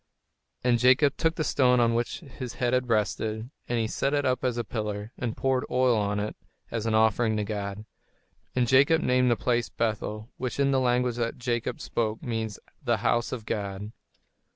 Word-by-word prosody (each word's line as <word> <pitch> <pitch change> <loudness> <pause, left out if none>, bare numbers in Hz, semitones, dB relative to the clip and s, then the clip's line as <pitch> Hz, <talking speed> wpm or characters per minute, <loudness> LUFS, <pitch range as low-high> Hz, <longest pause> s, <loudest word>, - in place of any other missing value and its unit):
And 120 -1 +3
Jacob 130 +3 +5
took 165 0 +1
the 155 - -1
stone 125 -4 +3
on 115 -1 +3
which 120 +1 -1
his 130 -5 -8
head 125 0 0
had 125 -1 +1
rested, 110 +1 -1 0.2
and 120 - +1
he 115 - +1
set 135 +5 0
it 145 0 +1
up 130 0 +1
as 125 -2 0
a 120 - 0
pillar, 105 -1 -4
and 120 -3 -4
poured 130 -1 +1
oil 125 -1 +3
on 105 -1 0
it 105 +1 -3 0.4
as 115 -1 -2
an 110 - +2
offering 110 0 +3
to 105 - 0
God. 100 0 -4 0.7
And 125 -1 +2
Jacob 140 +6 +5
named 125 0 +3
that 120 - +4
place 120 -1 0
Bethel, 110 -1 -3
which 125 +1 -4
in 140 0 +3
the 135 - +3
language 125 -1 +1
that 115 -1 -2
Jacob 120 -1 -2
spoke 110 -1 -2
means 110 -3 -3 0.3
"The - - +2
House 120 0 +2
of 115 -4 -5
God." 100 -1 -4
120 Hz, 195 wpm, -27 LUFS, 110-125 Hz, 0.7 s, Jacob